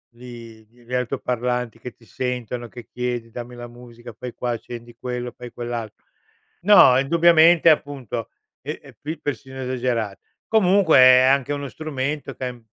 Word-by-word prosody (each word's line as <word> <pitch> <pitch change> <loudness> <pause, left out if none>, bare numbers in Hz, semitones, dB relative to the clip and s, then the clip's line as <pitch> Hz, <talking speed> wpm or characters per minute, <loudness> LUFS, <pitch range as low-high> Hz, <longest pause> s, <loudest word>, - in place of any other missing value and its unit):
li 115 -2 -12
gl 120 +2 -24
gli 125 - -9
altoparlanti 125 -1 -2
che 125 +1 -8
ti 115 - -23
sentono, 125 -1 -4
che 120 0 -12
chiedi: 120 -2 -4
"Dammi 120 +1 -8
la 120 0 -8
musica, 120 0 -13
fai 125 +1 -7
qua, 125 - -3
accendi 120 0 -8
quello, 125 -1 -5
fai 125 -1 -9
quell'alt" 120 -2 -5 0.7
no, 190 -10 +7
indubbiamente, 165 +3 +5
appunto, 135 -7 -1 0.3
e - - -6
e - - -16
qui 155 +3 -5
persino 135 -2 -6
esagera 120 -5 -2 0.3
Comunque 195 -6 +4
è 130 0 +8
anche 135 +1 +2
uno 140 -1 -4
strumento 145 -2 -4
che 130 - -5
ha - - -1
im 120 -2 -12
125 Hz, 160 wpm, -22 LUFS, 120-140 Hz, 0.7 s, è